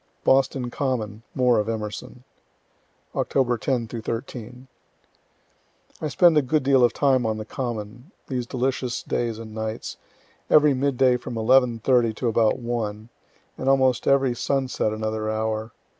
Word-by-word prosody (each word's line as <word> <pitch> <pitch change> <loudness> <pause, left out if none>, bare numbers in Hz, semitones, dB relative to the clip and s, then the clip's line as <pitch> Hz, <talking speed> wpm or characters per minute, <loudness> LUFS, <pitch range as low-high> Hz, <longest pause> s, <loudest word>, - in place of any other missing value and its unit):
BOSTON 130 -2 +2
COMMON 115 -7 -2
MORE 125 -3 +3
OF 105 +1 -1
EMERSON 110 +3 -5 0.9
Oct. 125 -3 0
10 120 -1 -1
13. 120 +2 -6 1.3
I 155 - -1
spend 165 +3 +4
a 150 - +5
good 145 +2 0
deal 135 -1 +4
of 120 - +5
time 130 -2 +2
on 110 -1 -1
the 110 - -6
Common, 120 +2 -5 0.2
these 125 -3 -3
delicious 125 -1 -2
days 115 -2 -2
and 110 -1 -9
nights 110 0 -5 0.5
every 150 -1 +6
mid 135 0 0
day 125 -1 +4
from 125 0 -7
11.30 120 0 +3
to 125 - -2
about 115 0 +2
1 115 -3 -4 0.5
and 135 - 0
almost 130 -2 +2
every 135 -2 +3
sunset 130 -3 -1
another 110 0 -3
hour. 110 0 -2
120 Hz, 140 wpm, -24 LUFS, 110-130 Hz, 1.3 s, every